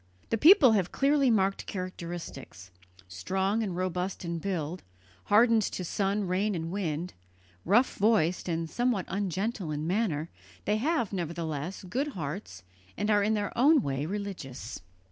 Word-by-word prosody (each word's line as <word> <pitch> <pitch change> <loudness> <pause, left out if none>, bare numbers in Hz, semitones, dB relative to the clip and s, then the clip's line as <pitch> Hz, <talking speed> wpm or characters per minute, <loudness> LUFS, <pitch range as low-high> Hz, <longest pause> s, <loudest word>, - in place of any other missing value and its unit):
The 225 - +2
people 315 - +8
have 195 -5 +1
clearly 280 -1 +3
marked 195 -3 +1
characteristics; 170 - -7 0.4
strong 190 - -1
and 195 -5 -2
robust 185 0 -2
in 170 0 -3
build, 175 -2 -3 0.4
hardened 225 +2 +5
to 190 - -3
sun, 200 +3 0
rain, 190 +3 0
and 165 0 -4
wind, 175 -3 -3 0.5
rough 225 +9 +3
voiced 195 -5 +2
and 165 0 -1
somewhat 240 0 0
ungentle 195 0 -2
in 150 0 -3
manner, 170 -4 -1 0.3
they 210 - +2
have, 260 - 0
nevertheless, 170 0 -4
good 265 +10 -2
hearts 145 - -6 0.3
and 210 +1 0
are 205 -1 +4
in 215 +2 +2
their 205 -1 -3
own 285 +3 +5
way 140 +2 -2
religious. 175 - -6
190 Hz, 145 wpm, -29 LUFS, 165-215 Hz, 0.5 s, people